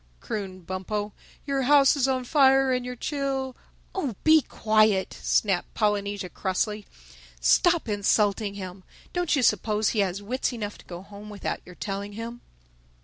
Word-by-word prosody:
crooned 185 - -5
Bumpo. 205 +3 -3 0.3
"Your 275 -1 0
house 275 +1 +5
is 270 -2 +2
on 260 -1 0
fire 270 -1 +4
and 250 0 0
your 250 0 -5
chil—" 270 -1 -2 0.4
"Oh, 285 - -2
be 315 0 +6
quiet!" 215 -5 +2
snapped 195 -4 +1
Polynesia 205 -2 0
crossly. 205 +3 -2 0.5
"Stop 340 - +3
insulting 205 0 +1
him! 185 -1 -8 0.3
Don't 355 -3 +1
you 275 - +1
suppose 210 0 +2
he 220 - -1
has 195 -1 0
wits 250 +5 -2
enough 210 -3 -5
to - - -16
go 175 +1 -8
home 205 +1 -11
without 205 -1 -4
your 180 - -11
telling 200 +2 -5
him?" 230 +2 -7
215 Hz, 150 wpm, -26 LUFS, 200-265 Hz, 0.5 s, be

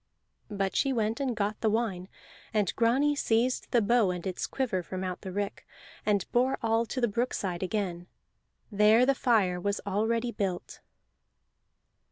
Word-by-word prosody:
But 195 -2 -2
she 275 - +2
went 225 -2 0
and 265 -4 -1
got 210 0 -2
the 220 - +2
wine, 210 -5 -1 0.5
and 205 -4 +1
Grani 265 +6 +3
seized 245 -1 +1
the 235 -3 +3
bow 225 -1 +3
and 180 -1 -4
its 185 -2 -3
quiver 245 -9 -1
from 185 +2 -5
out 185 -1 -4
the 190 - -6
rick, 200 +1 -3 0.4
and 205 -3 +2
bore 255 +2 +2
all 225 +1 +2
to 255 - -3
the 240 - +3
brookside 200 -5 -2
again. 185 -3 -2 0.6
There 215 +4 +5
the 275 - +4
fire 205 -9 +2
was 200 +2 -1
already 225 +4 0
built. 190 -5 -4
215 Hz, 160 wpm, -29 LUFS, 190-235 Hz, 0.6 s, There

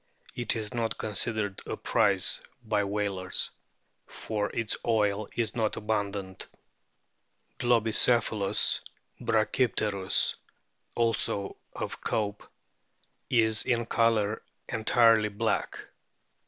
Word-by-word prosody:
It 120 0 0
is 110 +1 -4
not 115 -2 -1
considered 105 -1 -1
a - - -3
prize - - +3 0.2
by 105 -2 +1
whalers, 100 -2 -1 0.6
for 105 -2 -3
its 115 -2 -2
oil 105 -2 +1
is 115 -3 -1
not 110 -3 0
abundant. 100 -3 -3 1.1
Globicephalus 115 -3 +3 0.4
brachypteriis, 110 -3 +1 0.6
also 115 -4 0 0.2
of - - -5
Cope,* 105 -1 -2 0.8
is 110 -3 +4
in 120 -2 0
colour 110 -2 +1 0.3
entirely 115 -1 +4
black. 110 +2 -1
110 Hz, 85 wpm, -28 LUFS, 105-115 Hz, 1.1 s, is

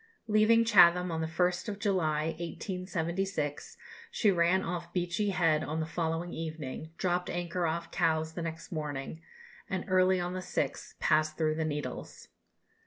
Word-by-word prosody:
Leaving 220 +2 +5
Chatham 180 -5 +6
on 160 0 -2
the 160 - -1
1st 180 +5 0
of 200 - -4
July, 160 -7 +1
1876, 180 -3 -3 0.3
she 210 - +3
ran 180 +1 +3
off 170 0 -4
Beachy 180 +3 0
Head 165 -5 +2
on 155 +2 -3
the 160 - -1
following 165 +1 -2
evening, 160 -2 -5
dropped 180 -1 0
anchor 175 0 -1
off 170 +1 -3
Cowes 160 0 +1
next 165 -1 -5
morning, 150 -1 -4 0.5
and 185 -1 -2
early 185 -1 +4
on 175 0 -2
the 185 - -3
6th 175 -6 -3
passed 155 0 +2
through 155 -1 +2
the 160 0 -1
Needles. 150 -1 -5
170 Hz, 150 wpm, -30 LUFS, 160-185 Hz, 0.5 s, Chatham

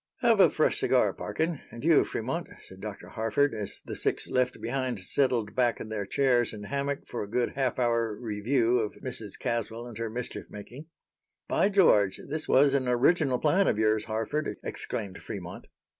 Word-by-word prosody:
"Have - - +4
a - - +8
fresh - - +1
cigar, - - +3
Parkin. 160 -2 -2
And 115 - -10
you, 160 -1 +5
Fremont," 135 +10 -3
said 95 - -13
Dr. 105 -2 -7
Harford, 115 +5 +1
as 105 -3 -5
the - - -5
six - - -1
left 125 -1 0
behind 125 -1 -2
settled 115 0 +1
back 120 -1 +1
in 110 - -7
their 105 -3 -3
chairs 125 -1 +2
and 105 -1 -8
hammock 140 +3 -2
for 120 - -4
a 100 - -5
good 120 +2 0
half 135 -2 -1
hour 115 -3 +1
review 120 +2 +1
of 110 -2 -2
Mrs. 115 -6 -6
Caswell 115 0 -3
and 120 -3 -9
her 115 -1 -2
mischief 120 +2 -6
making. 125 +9 -10 0.6
"By 195 - +2
George! 105 - +4
this 155 +2 -4
was 140 +1 +5
an 135 -2 +1
original 130 +2 +3
plan 175 +8 +3
of - - +2
yours, 110 0 +2
Harford," 115 +7 -2
exclaimed 95 -2 -4
Fremont. - - -7
120 Hz, 180 wpm, -28 LUFS, 110-140 Hz, 0.6 s, a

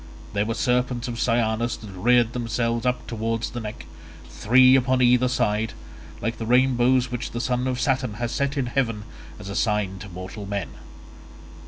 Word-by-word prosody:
There 100 +1 0
were 115 - -1
serpents 125 +1 0
of 120 -1 -5
cyanus 115 -1 +1
that 105 -3 -10
reared 120 +5 +2
themselves 115 0 -1
up 125 0 -1
towards 115 0 -3
the 120 - -5
neck, 105 -2 -7 0.5
three 130 +4 +5
upon 130 0 +2
either 125 +1 +4
side, 110 -2 0 0.5
like 115 +2 -3
the 115 - -4
rainbows 125 0 +3
which 125 -1 -3
the 120 - -5
son 125 +1 -1
of 125 -1 -2
Saturn 130 -5 0
has 120 +1 -3
set 140 +1 -1
in 135 - +1
heaven 120 -4 -1 0.3
as 105 - -10
a 100 - -5
sign 105 -4 0
to 100 - -9
mortal 95 +3 -8
men. 100 -2 -3
120 Hz, 175 wpm, -24 LUFS, 110-125 Hz, 0.5 s, three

